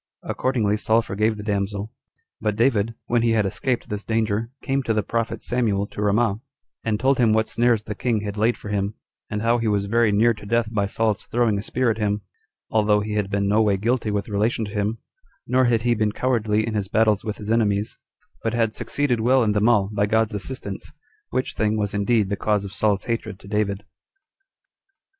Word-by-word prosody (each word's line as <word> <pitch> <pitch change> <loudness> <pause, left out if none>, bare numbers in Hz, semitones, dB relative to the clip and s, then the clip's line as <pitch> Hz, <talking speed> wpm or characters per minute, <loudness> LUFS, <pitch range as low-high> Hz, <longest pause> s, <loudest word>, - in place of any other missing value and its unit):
Accordingly 110 -6 0
Saul 110 +1 +2
forgave 110 +1 0
the 105 - -7
damsel; 100 0 -2 0.5
but 105 -1 0
David, 115 -1 +2
when 120 -1 +1
he 115 -1 +2
had 110 -2 +2
escaped 120 +5 -1
this 105 0 -4
danger, 110 0 0
came 135 0 0
to 115 -4 -1
the 105 - +1
prophet 115 +3 -2
Samuel 110 -5 0
to - - -6
Ramah, 105 +1 +1 0.4
and 110 -2 0
told 135 +2 +2
him 115 -3 +4
what 110 0 +2
snares 120 -2 +2
the 110 - -5
king 115 0 -1
had 105 -1 -4
laid 110 +3 +1
for 105 - -9
him, 100 0 -1 0.3
and 105 +1 -3
how 120 +1 +3
he 115 - -1
was 100 -2 +1
very 115 +1 +3
near 115 +3 +4
to 105 - -12
death 115 0 0
by 100 -2 +1
Saul's 110 0 0
throwing 115 -4 +1
a - - -3
spear 125 +2 0
at 110 - -4
him, 105 -1 0 0.5
although 105 -1 +3
he 105 +1 -4
had 105 -2 -1
been 100 0 0
no 105 +2 +3
way 105 -3 +2
guilty 115 +2 0
with 105 -1 -1
relation 110 +2 0
to 100 - -8
him, 105 +1 -1 0.5
nor 130 0 +3
had 115 -2 +2
he 120 -1 +3
been 105 -2 0
cowardly 110 -4 +1
in 115 - -3
his 105 -2 -1
battles 110 0 +2
with 105 -1 -4
his 105 0 -5
enemies, 105 -2 +1 0.4
but 115 0 -1
had 115 -2 +1
succeeded 140 -5 0
well 125 +3 +4
in 105 - +2
them 105 +2 +3
all, 105 -5 +3
by 105 0 +1
God's 110 +1 +1
assistance; 105 0 -5 0.4
which 130 - -2
thing 110 0 0
was 105 -1 -1
indeed 105 +1 +2
the 100 - 0
cause 105 0 0
of 95 - -8
Saul's 100 -1 +1
hatred 115 -4 -3
to 100 - -15
David. 100 -1 -1
110 Hz, 210 wpm, -23 LUFS, 105-115 Hz, 0.5 s, him